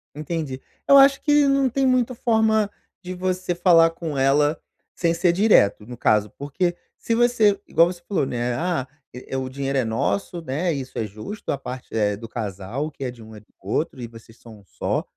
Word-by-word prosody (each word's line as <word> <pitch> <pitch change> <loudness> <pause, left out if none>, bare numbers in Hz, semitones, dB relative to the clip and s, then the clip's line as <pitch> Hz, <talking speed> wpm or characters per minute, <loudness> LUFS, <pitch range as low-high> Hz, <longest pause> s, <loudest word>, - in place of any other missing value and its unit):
Entendi, 150 -3 -4 0.3
eu 280 - +8
acho 275 0 +6
que 295 -1 +4
não 275 -1 +2
tem 270 +3 0
muita 255 -1 +2
forma 220 -3 +2 0.3
de 180 +1 -6
você 185 0 -2
falar 170 -2 +5
com 165 -3 -6
ela 145 +3 +3 0.4
sem 170 -1 +1
ser 170 +1 +2
direto, 170 - +3
no 120 +1 -9
caso, 105 -1 +2
porque 175 +5 -2 0.2
se 230 - -2
você, 230 -4 +3
igual 165 +2 +4
você 175 -1 -7
falou, 195 -8 0
né, 120 -1 -2
ah, 165 -2 -2 0.3
é 125 +2 -10
é - - 0
o 130 0 -3
dinheiro 135 +1 -3
é 130 - +2
nosso, 170 - -2
né, 160 +4 -2
isso 135 -3 -6
é 110 - -1
justo, 110 - -9
a - - -1
parte 130 -1 -8
é 105 -2 +1
do 115 +2 -9
casal, 100 +6 -4
o - - -9
que 140 - -9
é 125 - -3
de 120 -2 -15
um 110 0 -12
é - - -10
do - - -27 0.2
outro 125 - -2
e 120 - -5
vocês 115 0 -16
são 115 -3 -14
um - - -20
só, - - -2
150 Hz, 215 wpm, -23 LUFS, 120-195 Hz, 0.4 s, eu